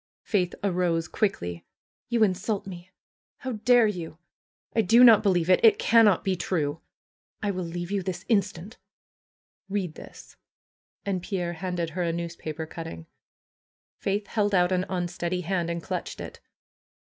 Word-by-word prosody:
Faith 180 -5 0
arose 175 -4 +1
quickly. 85 - -2 0.5
"You 235 -2 +3
insult 200 +1 0
me! 180 -1 -9 0.5
How 260 - -5
dare 240 +1 +4
you! 175 -6 -4 0.6
I 225 - +5
do 225 +5 +6
not 230 -4 +8
believe 180 -4 +2
it! 185 - +5
It 220 -3 +7
cannot 225 -5 +4
be 190 -1 +1
true! 165 -3 -2 0.6
I 205 - +1
will 185 -2 -3
leave 175 +2 -5
you 200 -1 0
this 185 -1 -5
instant!" 200 -1 -1 0.9
"Read 190 -5 -2
this!" - - -13 0.7
And 190 -3 -1
Pierre 175 -2 -3
handed 175 -1 -3
her 180 +3 -3
a 170 -1 +1
newspaper 165 -2 -5
cutting. 120 - -8 0.9
Faith 200 +1 -1
held 205 -1 0
out 180 0 +3
an 185 0 0
unsteady 175 0 -2
hand 175 -1 -1
and 170 -1 -3
clutched - - -4
it. - - -8
185 Hz, 150 wpm, -26 LUFS, 170-205 Hz, 0.9 s, not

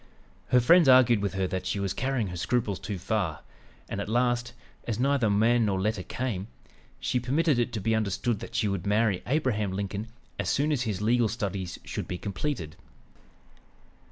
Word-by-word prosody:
Her 125 0 +5
friends 165 +5 +6
argued 125 -3 +6
with 100 -2 -2
her 95 -1 +1
that 95 0 -3
she 100 +2 -1
was 100 -1 -1
carrying 130 -6 -1
her 90 - -6
scruples 105 +2 -1
too 105 -1 -4
far, 90 -4 -2 0.5
and 100 - -4
at 100 - -5
last, 120 +1 +1 0.3
as 115 -3 -2
neither 135 -3 +2
man 115 +4 +3
nor 95 -2 0
letter 105 0 0
came, 105 -2 -3 0.5
she 125 - 0
permitted 140 +3 +1
it 120 0 0
to 110 - -2
be 110 +3 0
understood 110 +1 0
that - - -9
she 110 - +2
would 100 -2 -2
marry 105 -2 +2
Abraham 120 -8 0
Lincoln 100 +2 -3 0.3
as - - -1
soon 145 +3 +1
as 140 -5 +1
his 105 -4 -2
legal 120 +1 +3
studies 100 -5 -3
should - - -4
be 90 - -3
completed. 95 - -4
110 Hz, 185 wpm, -28 LUFS, 100-125 Hz, 0.5 s, friends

